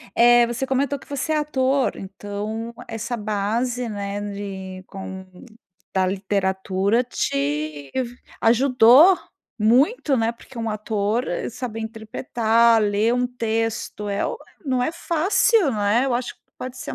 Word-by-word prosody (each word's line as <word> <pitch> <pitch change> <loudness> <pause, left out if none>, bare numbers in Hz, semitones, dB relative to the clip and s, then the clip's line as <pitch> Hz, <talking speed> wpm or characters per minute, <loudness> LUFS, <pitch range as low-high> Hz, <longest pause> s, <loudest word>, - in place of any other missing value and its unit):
Eh, 240 0 +6
você 240 +3 -2
comentou 275 +2 0
que - - -17
você 285 +2 -2
é 310 - +2
ator, 275 -2 +1
então 205 +4 -5
essa 225 +2 -4
base, 225 +4 -1
né, 200 -1 -4
de 190 -2 -7
com 190 -1 -8 0.7
da 190 -1 +2
literatura, 195 +3 0
te 145 - -2 0.5
ajudou 255 +8 +6 0.4
muito, 270 - +3
né. 225 0 +1
Porque 235 +1 -15
um 225 -1 -2
ator 215 +2 -1
é - - -2
saber 230 -2 -5
interpretar, 225 0 +2
ler 210 +3 +2
um 250 0 +1
texto 225 -3 -2
é 200 - 0
o - - -3 0.3
não 255 -2 +1
é 315 - 0
fácil 340 - +2
não 210 -2 -2
é, 220 +6 +3
eu 260 - 0
acho 245 0 -3
que - - -42 0.2
pode 255 0 -7
ser - - -6
225 Hz, 140 wpm, -23 LUFS, 205-255 Hz, 0.7 s, Eh